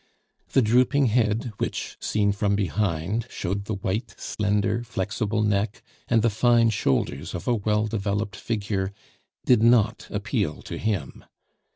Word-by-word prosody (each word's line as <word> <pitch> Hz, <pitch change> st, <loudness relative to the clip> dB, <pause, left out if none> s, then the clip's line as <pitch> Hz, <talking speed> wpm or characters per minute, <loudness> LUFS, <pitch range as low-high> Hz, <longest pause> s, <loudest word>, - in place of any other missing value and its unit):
The 135 Hz, -, +5 dB
drooping 125 Hz, +5 st, +3 dB
head 115 Hz, 0 st, +1 dB
which, -, -, -3 dB
seen 105 Hz, -1 st, +1 dB
from 100 Hz, 0 st, +1 dB
behind, 100 Hz, +2 st, -1 dB
showed 100 Hz, +2 st, -3 dB
the 110 Hz, -, -2 dB
white, 100 Hz, +4 st, -3 dB
slender, 105 Hz, +1 st, 0 dB
flexible 105 Hz, +1 st, -1 dB
neck 105 Hz, +1 st, 0 dB, 0.2 s
and 115 Hz, -2 st, +3 dB
the 115 Hz, -, +4 dB
fine 115 Hz, +1 st, +4 dB
shoulders 85 Hz, -10 st, -1 dB
of -, -, -6 dB
a 125 Hz, -, +3 dB
well 105 Hz, -1 st, +1 dB
developed 105 Hz, 0 st, -2 dB
figure, 100 Hz, -3 st, -2 dB, 0.5 s
did 125 Hz, -4 st, +5 dB
not 115 Hz, -2 st, +3 dB
appeal -, -, -2 dB
to -, -, -6 dB
him. 100 Hz, -11 st, -2 dB
105 Hz, 140 wpm, -25 LUFS, 100-115 Hz, 0.5 s, The